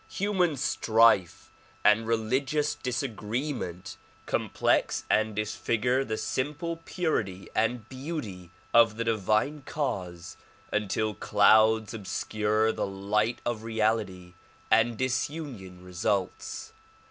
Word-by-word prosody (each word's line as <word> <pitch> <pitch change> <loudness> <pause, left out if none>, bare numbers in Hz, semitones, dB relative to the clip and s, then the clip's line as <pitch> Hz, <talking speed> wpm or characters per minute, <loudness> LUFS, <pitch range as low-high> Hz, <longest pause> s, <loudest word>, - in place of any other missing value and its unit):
Human 185 -6 +1
strife 115 -7 +3 0.3
and 110 +2 +5
religious 130 +7 0
disagreement 120 - -4 0.3
complex - - +1
and 110 -1 +2
disfigure 115 +4 0
the 110 -4 -3
simple 150 +8 -2
purity 105 - -2
and 115 0 0
beauty 130 - -6 0.2
of 115 -2 +5
the 115 - -1
divine 110 +6 0
cause 90 - -4 0.4
until 105 +1 0
clouds 110 +2 +4
obscure 110 +1 0
the - - -2
light 105 +4 -1
of 120 -2 -2
reality 110 -5 -1 0.4
and 115 0 +4
disunion 130 - -3
results. 95 +2 -3
110 Hz, 95 wpm, -28 LUFS, 105-130 Hz, 0.4 s, and